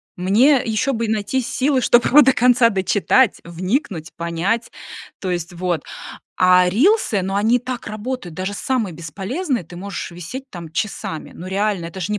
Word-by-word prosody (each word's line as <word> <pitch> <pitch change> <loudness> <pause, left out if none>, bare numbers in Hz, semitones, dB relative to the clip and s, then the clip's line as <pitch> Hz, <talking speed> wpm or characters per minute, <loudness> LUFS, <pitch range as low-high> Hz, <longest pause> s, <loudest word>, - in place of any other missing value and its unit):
Мне, 235 +10 +4
э, - - -9
ещё 230 +4 0
бы 230 -1 -1
и - - -3
найти 220 +4 0
силы, 260 +2 0
чтобы 240 0 +4
его 295 +4 +7
до 265 -1 +5
конца 245 -1 +4
дочитать, 200 +4 +2
вникнуть, 180 - -3
понять. 170 +8 -2 0.5
То 190 - -4
есть 175 0 -3
вот, 175 -1 -2 0.5
а 180 0 +5
рилсы 235 - +2
но 195 +2 -2
они 225 +4 +3
так 250 0 -6
работают, 215 -4 -5
даже 185 +3 -3
самые 235 -5 -1
бесполезные 205 - -3
ты 175 +2 -12
можешь 195 +2 -6
висеть 180 +11 -7
там 170 -3 -9
часами. 165 -4 -4
Ну, 180 - -9
реально, 195 -2 -1
это 170 +3 -8
ж 180 - -2
не 210 0 -1
205 Hz, 175 wpm, -20 LUFS, 180-250 Hz, 0.5 s, его